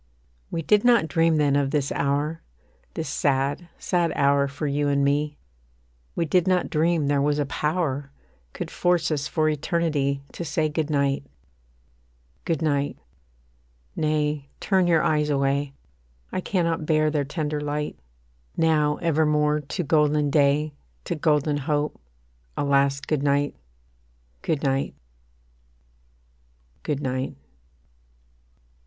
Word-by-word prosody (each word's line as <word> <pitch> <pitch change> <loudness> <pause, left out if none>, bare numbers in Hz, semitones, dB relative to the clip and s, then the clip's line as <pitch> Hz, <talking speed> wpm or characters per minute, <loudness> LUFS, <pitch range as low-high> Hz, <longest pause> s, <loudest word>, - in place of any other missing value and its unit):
We 165 - -3
did 210 +5 +3
not 235 -8 +4
dream 165 0 +2
then 145 -2 +3
of 140 -1 +2
this 140 -1 0
hour, 145 +3 -1 0.5
This 160 - -3
sad, 140 +4 0
sad 175 -2 0
hour 140 0 +3
for 140 +2 -5
you 145 0 0
and 140 0 +2
me; 145 +1 0 0.8
We 170 - 0
did 180 +3 +2
not 185 -1 +1
dream 160 0 +2
there 140 0 +2
was 145 +1 +1
a 145 - +1
power 145 -2 -1 0.4
Could - - -6
force 175 -3 +1
us 145 -1 -1
for 155 0 +1
eternity 150 -3 0
To - - -6
say 155 0 0
Good 155 0 -2
night. 140 -1 0 1.2
Good 165 -2 -1
night 145 -2 0 1.0
nay, 150 -2 -1
turn 190 -3 +2
your 165 -2 +3
eyes 150 -1 +1
away; 140 0 0 0.6
I 185 - -2
cannot 165 -5 -1
bear 155 -1 +3
their 150 -2 +1
tender 150 0 -3
light. 150 0 -3 0.6
Now 150 -2 +3
evermore 150 -2 +2
to 150 +5 -4
golden 150 -1 +2
day, 145 +1 +2 0.3
To - - -2
golden 150 -1 +1
hope, 145 - -2 0.6
a - - 0
last 140 0 +2
Good 155 -3 0
night, 145 0 +1 0.9
Good 155 -3 -1
night 135 -1 0 1.9
Good 145 -1 -3
night. 130 0 -2
150 Hz, 130 wpm, -24 LUFS, 140-160 Hz, 1.9 s, not